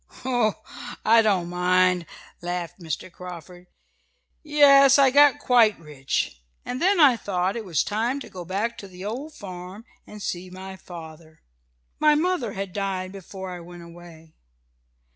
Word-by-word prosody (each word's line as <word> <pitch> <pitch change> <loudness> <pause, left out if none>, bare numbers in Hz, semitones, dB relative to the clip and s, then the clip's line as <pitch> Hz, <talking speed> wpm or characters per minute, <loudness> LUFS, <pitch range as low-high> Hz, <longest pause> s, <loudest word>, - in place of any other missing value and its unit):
"Oh, 245 -5 +1 0.5
I 230 +1 +6
don't 195 -6 +1
mind!" 180 0 +2 0.3
laughed 175 0 -4
Mr. 165 +1 -5
Carford 180 0 -11 0.7
"Yes, 280 -3 +6
I 275 -2 +5
got 290 +1 +6
quite 240 -6 +4
rich, 135 - -3 0.2
and 250 +1 -4
then 380 +1 +3
I 280 -6 +7
thought 190 -3 -2
it 230 - -4
was 170 -5 +1
time 230 +6 -1
to - - -8
go 180 -2 -8
back 200 +7 -3
to 200 - -9
the 185 0 -10
old 270 +9 -5
farm, 185 +2 -9 0.2
and 210 - -10
see 185 -2 -4
my 190 +1 -9
father. 160 -3 -12 0.6
My 305 -1 +5
mother 305 - 0
had 195 -1 -5
died 190 -2 -3
before 190 -1 -8
I 180 - -7
went 175 0 -11
away. 170 -2 -14
190 Hz, 150 wpm, -24 LUFS, 175-235 Hz, 0.7 s, I